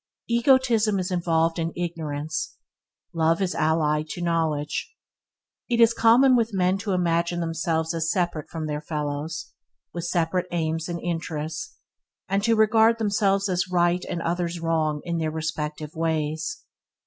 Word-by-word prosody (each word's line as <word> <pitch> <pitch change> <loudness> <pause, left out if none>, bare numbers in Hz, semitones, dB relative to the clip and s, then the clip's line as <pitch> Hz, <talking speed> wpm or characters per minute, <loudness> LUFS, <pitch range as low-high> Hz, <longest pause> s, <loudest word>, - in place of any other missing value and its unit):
Egotism 235 -3 +3
is 185 0 -2
involved 165 -2 +1
in 165 0 -1
ignorance; 165 - -4 0.6
love 165 0 +2
is 190 -2 0
allied 155 -1 +1
to - - -5
knowledge. 165 - -1 0.7
It 235 -1 +1
is 230 0 +6
common 250 +4 +5
with 230 -3 +1
men 185 +1 +2
to 200 -1 -2
imagine 170 -1 +1
themselves 165 0 -1
as 165 -1 -1
separate 175 -5 -1
from 160 -1 -4
their 150 -1 -3
fellows, 150 +1 -4 0.4
with 170 -1 -4
separate 175 +1 0
aims 165 -1 -2
and 170 0 -3
interests; 165 +3 -4 0.5
and 195 +1 0
to 230 +1 +3
regard 220 +1 +4
themselves 200 -2 +1
as 180 -1 -1
right 175 0 +2
and 170 -2 -3
others 175 0 -1
wrong 160 -2 0
in 170 -1 -2
their 160 -1 0
respective 155 -1 -4
ways. 160 -1 -2
170 Hz, 145 wpm, -25 LUFS, 160-195 Hz, 0.7 s, is